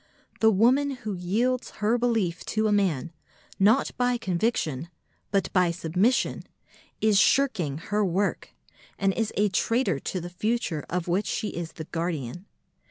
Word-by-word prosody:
The 220 - +5
woman 245 +8 +4 0.2
who 210 - -2
yields 225 +8 0
her 215 +2 +2
belief 225 -8 0
to 220 0 0
a 215 - +2
man, 175 -7 +1 0.5
not 205 +3 +4
by 245 0 +2
conviction, 175 - -1 0.4
but 195 -1 0
by 180 -2 +4
submission, 180 +8 +1 0.6
is 215 -2 +4
shirking 200 - +2
her 210 +6 -1
work, 195 +2 -1 0.5
and 195 -1 +1
is 225 0 -1
a 205 +1 +3
traitor 200 - +1
to 185 - -3
the 175 +1 -7
future 190 -5 -1
of 180 0 -2
which 185 +4 0
she 215 - -2
is 165 -1 -6
the 160 - -7
guardian. 165 - -4
195 Hz, 150 wpm, -26 LUFS, 175-225 Hz, 0.6 s, The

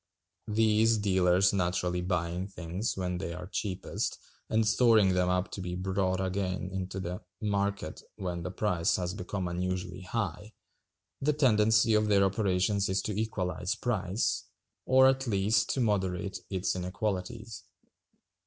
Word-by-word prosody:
These 110 +1 +3
dealers 95 -2 +3
naturally 90 -1 0
buying 90 0 -1
things 90 +3 -4
when 90 -1 -2
they 85 -2 -4
are 90 +1 -7
cheapest, 95 -1 -3 0.3
and 110 0 +2
storing 105 -3 +5
them 90 0 +2
up 90 +1 0
to 100 - -5
be 90 -1 -4
brought 95 0 0
again 95 -1 -2
into 95 0 -4
the 90 -1 -4 0.2
market 100 -5 -2
when 90 -2 -4
the 90 - -4
price 90 -2 +1
has 90 -1 -2
become 95 -1 -4
unusually 90 +1 -3
high, 105 +1 -4 0.7
the 150 +2 +2
tendency 110 -5 +4
of 105 0 +3
their 100 -2 +4
operations 95 0 +1
is 95 0 0
to 105 - -3
equalize 95 -4 -2
price, 105 -3 -1 0.4
or 130 0 +6
at 135 0 +1
least 105 0 +2
to - - -1
moderate 95 -3 0
its 95 -1 -1
inequalities. 95 +3 -3
95 Hz, 140 wpm, -30 LUFS, 90-105 Hz, 0.7 s, or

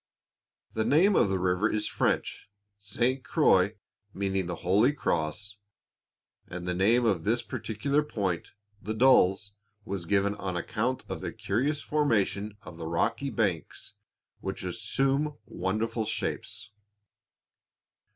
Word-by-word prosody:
The 110 - 0
name 160 - +4
of - - +4
the 95 - +1
river 90 +3 +1
is 105 -1 0
French, - - -1 0.3
"Sainte 120 +6 0
Croix," 105 - +3 0.4
meaning 95 -2 -1
"The 90 - -3
holy 105 +10 +4
cross," 100 - -2 0.9
and 90 0 -6
the 90 - 0
name 110 +7 +3
of 95 -8 +1
this 115 +4 +1
particular 140 +7 -1
point, 100 - -2 0.3
the 110 +3 -4
"Dalles," 100 -5 +4 0.3
was 95 -4 -4
given 100 +1 +2
on 95 -3 -4
account 120 +8 -2
of - - -5
the - - -3
curious 115 +8 -1
formation 105 -8 0
of 80 - -10
the 80 -1 -5
rocky 115 +11 0
banks, 100 - -2 0.5
which - - -5
assume 140 +2 0
wonderful 110 +5 -2
shapes. 105 0 -3
105 Hz, 125 wpm, -28 LUFS, 95-120 Hz, 0.9 s, name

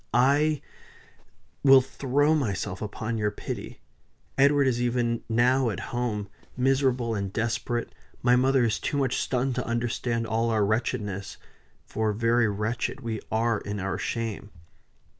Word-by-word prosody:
I 145 +4 +3 1.0
will 135 -1 +8
throw 135 +3 +1
myself 100 -9 -2
upon 110 +2 -3
your 105 -1 +1
pity. 105 - -7 0.5
Edward 140 +1 +4
is 120 -2 +1
even 120 -1 0
now 125 +2 +3
at 100 - -4
home 115 -4 -2 0.3
miserable 130 -2 +2
and 100 -2 -3
desperate; 120 +2 -2 0.3
my 125 0 +5
mother 130 0 +3
is 115 -2 +1
too 145 - -2
much 135 -3 +1
stunned 130 0 0
to 125 - -2
understand 115 0 -1
all 115 +1 0
our 110 -2 +2
wretchedness 105 -3 -2 0.5
for 110 -1 -1
very 115 +1 +2
wretched 110 +6 -2
we 115 -3 -3
are 115 0 +1
in 100 0 -5
our 95 -1 -2
shame." 115 -3 -3
120 Hz, 140 wpm, -26 LUFS, 110-130 Hz, 1.0 s, will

